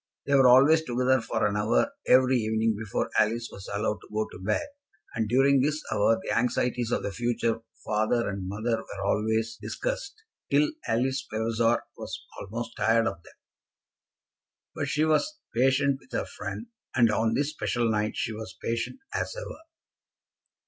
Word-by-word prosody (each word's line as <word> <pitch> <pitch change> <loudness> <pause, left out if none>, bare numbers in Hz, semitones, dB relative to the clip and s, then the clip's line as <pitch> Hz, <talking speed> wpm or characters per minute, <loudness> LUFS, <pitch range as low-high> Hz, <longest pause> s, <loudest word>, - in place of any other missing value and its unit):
They 140 - 0
were 135 -2 +7
always 140 +6 +7
together 125 -1 +2
for - - -1
an 105 -1 0
hour 110 - +2 0.2
every 130 0 +5
evening 110 0 +1
before 105 -1 -3
Alice 115 +2 +1
was 100 - -10
allowed 105 +1 -1
to - - -15
go 110 0 0
to - - -10
bed, 105 +2 0 0.5
and 110 -2 -1
during 135 +2 +4
this 150 +3 +1
hour 110 +1 +3
the - - -1
anxieties 125 0 0
of - - 0
the 100 - -2
future 115 +1 0 0.3
father 110 +3 +1
and 100 -2 -4
mother 110 +4 -1
were 100 -3 -7
always 110 +2 0
discussed - - -4 0.3
till 145 +1 +3 0.2
Alice 130 +4 0
Vavasor 115 +1 +1
was - - -6 0.2
almost 115 +4 -6
tired 115 0 +3
of 85 -6 -3
them. - - -18 1.4
But - - -3
she 155 +1 +1
was 155 - +1 0.2
patient 135 +2 +3
with 250 - -22
her - - -1
friend, - - -6 0.3
and 120 -4 +5
on 110 +1 +1
this 145 +2 0
special 120 -6 -1
night 110 -1 0
she 110 - -2
was 110 -3 -8
patient 115 - -3
as - - -2
ever. - - -7
115 Hz, 165 wpm, -27 LUFS, 110-130 Hz, 1.4 s, were